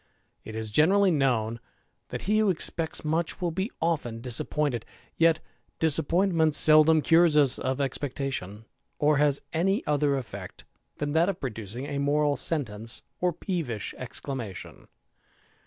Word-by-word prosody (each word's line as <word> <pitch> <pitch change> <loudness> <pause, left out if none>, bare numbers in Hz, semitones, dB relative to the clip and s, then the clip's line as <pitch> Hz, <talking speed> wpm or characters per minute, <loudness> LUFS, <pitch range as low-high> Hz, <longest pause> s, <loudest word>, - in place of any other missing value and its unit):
It 110 - -9
is 110 -1 -4
generally 190 - +4
m, 115 -5 0 0.5
that - - -6
he 215 +3 +2
who 215 -2 +3
expects 165 -2 -2
much 160 +2 -1
will 175 -2 -1
be 190 +6 -2
often 145 -9 -1
disap 140 +4 -1
:ed; 120 -2 -4 0.3
yet 165 -1 +3 0.4
disappointment 160 +1 +2
seldom 155 0 +7
cures 165 -2 +4
us 140 -3 +3
of 130 +1 -2
expectation, 130 -6 -4 0.3
as 150 -1 +2
any 195 +5 0
other 145 -1 +1
eflfect 100 -8 -6 0.3
than 145 0 -2
that 165 +4 +3
of 195 - -3
producing 115 0 -6
a 140 0 -4
moral 145 +1 +1 0.2
nee 115 -9 -3 0.3
or 180 0 +1
peevish 155 - -4
exclamation. 120 -5 -7
145 Hz, 135 wpm, -27 LUFS, 125-165 Hz, 0.5 s, seldom